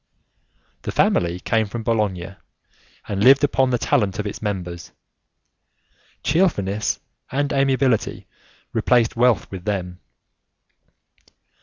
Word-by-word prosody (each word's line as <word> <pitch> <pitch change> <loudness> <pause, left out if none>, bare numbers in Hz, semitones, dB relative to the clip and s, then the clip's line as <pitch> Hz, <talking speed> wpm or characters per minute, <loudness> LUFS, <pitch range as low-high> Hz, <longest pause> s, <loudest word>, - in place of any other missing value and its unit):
The - - -4
family 85 0 +1
came 110 +1 0
from 115 +2 -6
Bologna 100 -5 -1 0.7
and 100 0 -1
lived 135 +3 +7
upon 135 -2 +2
the 125 - +1
talent 110 -6 +1
of 105 - -3
its 105 - -5
members; 90 -5 -4 1.3
cheerfulness 130 - +1 0.3
and 145 +2 0
amiability 135 -4 +1 0.5
replaced 120 -3 +2
wealth 120 -5 +2
with 95 -2 -7
them. 90 -3 -3
110 Hz, 105 wpm, -22 LUFS, 95-130 Hz, 1.3 s, lived